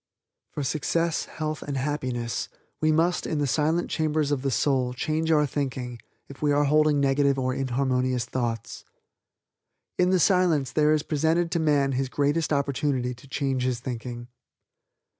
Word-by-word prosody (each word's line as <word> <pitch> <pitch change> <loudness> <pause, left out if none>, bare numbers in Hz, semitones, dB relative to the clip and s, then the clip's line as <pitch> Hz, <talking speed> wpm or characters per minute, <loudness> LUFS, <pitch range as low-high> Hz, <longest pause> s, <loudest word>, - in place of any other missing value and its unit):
For 145 - -4
success, 155 +5 0
health 155 -1 -4
and 140 -2 -4
happiness 130 -4 -2 0.3
we 155 0 +3
must 170 +3 +1
in 155 - -1
the 145 - +1
silent 160 +5 0
chambers 155 -2 0
of 140 -3 0
the 135 - 0
soul 130 -1 +1
change 160 +4 -1
our 150 -2 +4
thinking 130 -4 -4 0.3
if 140 - -12
we 150 -1 +2
are 145 +1 +3
holding 150 0 +3
negative 140 0 +2
or 130 -1 0
inharmonious 130 -2 0
thoughts. 120 -4 -4 1.2
In 180 0 +4
the 185 0 +3
Silence 175 -7 +3
there 150 0 +3
is 150 - -1
presented 165 +3 +1
to 170 - +1
man 145 -3 +2
his 130 0 -1
greatest 145 +4 0
opportunity 140 -3 0
to 125 +3 -15
change 135 -1 -1
his 125 -1 0
thinking. 120 -1 -6
140 Hz, 160 wpm, -26 LUFS, 130-155 Hz, 1.2 s, our